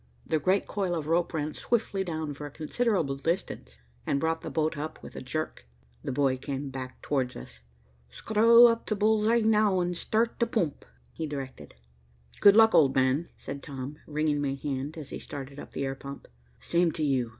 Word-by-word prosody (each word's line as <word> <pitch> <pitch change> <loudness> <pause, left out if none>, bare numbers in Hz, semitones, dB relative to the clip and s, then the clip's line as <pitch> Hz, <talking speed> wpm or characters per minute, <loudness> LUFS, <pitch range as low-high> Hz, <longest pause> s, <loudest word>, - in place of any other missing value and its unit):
The 155 - +1
great 185 +7 +2
coil 190 -3 -1
of 160 -3 -3
rope 170 +2 +1
ran 155 -2 -2
swiftly 215 -4 -1
down 160 -4 -3
for 145 +1 -7
a - - -8
considerable 160 - 0
distance, 165 +6 -3 0.3
and 140 - 0
brought 160 +2 0
the - - -5
boat 160 +1 0
up 155 +2 -5
with - - -10
a - - -6
jerk. 130 - -4 0.4
The - - -3
boy 130 0 +1
came 135 +1 -5
back 130 -1 -7
towards 130 -4 -1
us. - - -10 0.5
"Screw 225 - +6
up 230 -1 +2
t' 215 - 0
bull's 215 +1 +2
eye 235 +1 +4
now 215 -3 +3
an' 175 0 0
start 220 +6 0
t' 235 - +2
poomp," 170 - -1 0.3
he 160 - -4
directed. 135 -3 -7 0.6
"Good 200 0 +7
luck, 220 0 +7
old 135 -4 +5
man," 135 +5 +2
said 140 - -7
Tom, 140 +1 -7
wringing 150 -1 0
my 135 -1 -1
hand, 140 +2 -4
as 150 -3 -7
he - - -5
started 140 0 -8
up - - -10
the 140 - -2
air 135 - -2
pump. 140 +1 -9 0.3
"Same 170 -1 +2
to 155 - -3
you. 130 -5 +1
155 Hz, 195 wpm, -28 LUFS, 140-190 Hz, 0.6 s, Good